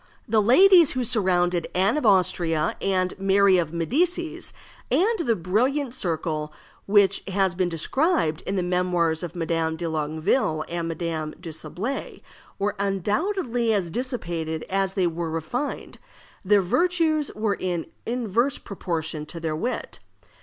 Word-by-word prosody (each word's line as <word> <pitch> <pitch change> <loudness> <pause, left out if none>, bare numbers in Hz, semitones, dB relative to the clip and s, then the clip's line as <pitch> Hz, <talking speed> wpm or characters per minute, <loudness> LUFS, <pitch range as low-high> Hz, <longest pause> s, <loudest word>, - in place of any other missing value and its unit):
The 220 0 +3
ladies 340 - +6
who 255 -1 -1
surrounded 180 -7 +1
Anne 195 +5 +3
of 300 -6 +1
Austria 175 -5 +2
and 185 -2 0
Mary 195 -1 +4
of 165 -3 -2
Medicis, 325 - -1 0.4
and 440 +5 +2
that 230 - 0
brilliant 250 - +1
circle 160 -7 -2 0.4
which 200 -1 +4
has 190 -2 +1
been 180 0 0
described 170 - 0
in 195 - -1
the 185 - 0
Memoirs 175 -2 +1
of 175 0 -6
Madame 165 -1 -1
de 170 0 -3
Longueville 155 - 0
and 170 -1 -3
Madame 160 -2 -3
de 175 -2 -7
Sablé, 175 - -5 0.3
were 205 +1 -1
undoubtedly 230 - 0
as 180 -5 -1
dissipated 170 - -3
as 195 0 0
they 190 -3 +2
were 170 -1 -2
refined; 165 - -4 0.4
their 200 0 +4
virtues 320 - +1
were 215 -1 0
in 175 -3 -2 0.2
inverse 240 +2 0
proportion 160 -5 -4
to 170 - -6
their 160 -2 -2
wit. 240 +11 -4
185 Hz, 140 wpm, -24 LUFS, 165-235 Hz, 0.4 s, ladies